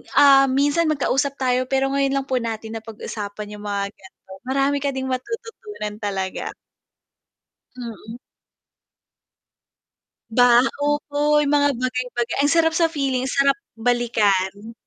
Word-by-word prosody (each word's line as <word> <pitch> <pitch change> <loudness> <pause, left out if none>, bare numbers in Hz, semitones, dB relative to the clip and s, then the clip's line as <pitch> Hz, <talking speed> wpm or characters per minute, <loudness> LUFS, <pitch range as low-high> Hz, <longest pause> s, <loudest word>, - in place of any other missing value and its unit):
ah, 275 -1 +7
minsan 290 +4 +2
magkausap 280 -1 0
tayo, 255 -1 +1
pero 270 0 +2
ngayon 275 0 +1
lang 270 - -7
po 260 - -1
natin 225 -2 -3
na 225 - -6
pag-usapan 210 -1 -7
yung 210 - -11
mga 200 -1 -3
ganon, 190 0 -15
marami 275 +2 +1
ka 280 - 0
ding 265 -1 -4
matututunan 265 - -5
talaga. 190 -2 -3 1.3
Mm. 230 -2 -8 2.2
Ba 245 0 +6 0.2
opo 295 0 +1
yung 285 - +1
mga 285 0 +4
bagay-baga 250 -1 -2
ang 285 - +3
sarap 325 0 +3
sa 330 0 +3
feeling, 265 -4 -1
sarap 275 +1 +2 0.2
balikan. 220 -3 0
255 Hz, 125 wpm, -22 LUFS, 220-280 Hz, 2.2 s, ah